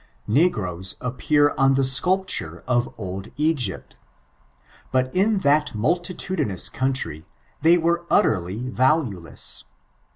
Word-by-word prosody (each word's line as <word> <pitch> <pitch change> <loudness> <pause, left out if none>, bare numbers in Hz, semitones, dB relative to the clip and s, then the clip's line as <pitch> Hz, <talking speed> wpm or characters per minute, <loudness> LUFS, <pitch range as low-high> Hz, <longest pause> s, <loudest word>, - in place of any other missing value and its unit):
Negroes 100 - 0
appear 145 +4 +1
on 135 0 +4
tiie 135 - +2
acapltiire 130 - +2
of 120 -1 0
eld 95 0 -6
Egypt 145 - -1 0.9
Bat 130 +2 0
in 205 +3 +2
that 150 +1 +2
maltitadinoaa 170 - -1
country 130 - -3 0.4
tibey 170 +2 +5
were 170 +1 0
ntteriy 105 +6 +1
vaftnelesa. 125 - 0
130 Hz, 100 wpm, -23 LUFS, 100-160 Hz, 0.9 s, tibey